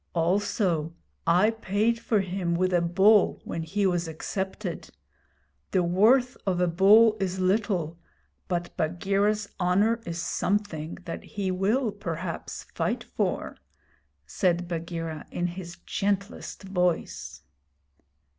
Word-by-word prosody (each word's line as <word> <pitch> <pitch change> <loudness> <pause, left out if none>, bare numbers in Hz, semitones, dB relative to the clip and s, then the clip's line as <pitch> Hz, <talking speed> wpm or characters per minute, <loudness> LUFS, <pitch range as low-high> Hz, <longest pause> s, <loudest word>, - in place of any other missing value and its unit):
'Also, 170 -2 +1 0.3
I 180 +6 +5
paid 225 +1 0
for 220 -3 +1
him 180 -2 -2
with 185 +1 +1
a 175 - +4
Bull 190 +5 +4
when 165 - -4
he 195 +6 -1
was 175 -2 +1
accepted. 190 +4 -4 0.8
The 185 -2 +2
worth 225 +9 +4
of 180 -2 +1
a 180 - +4
bull 210 +6 +6
is 190 -1 -1
little, 185 -4 0 0.5
but 175 -1 -3
Bagheera's 195 +5 +1
honour 200 +6 +2
is 170 0 -5
something 170 -3 -1
that 165 - -5
he 195 -3 -3
will 210 +6 +1
perhaps 170 -4 -5
fight - - -1
for,' - - -2 0.7
said 175 - 0
Bagheera, 165 -2 -4
in 175 - -2
his 175 -1 -6
gentlest 200 +2 -2
voice. 180 -3 -2
185 Hz, 115 wpm, -27 LUFS, 170-205 Hz, 0.8 s, bull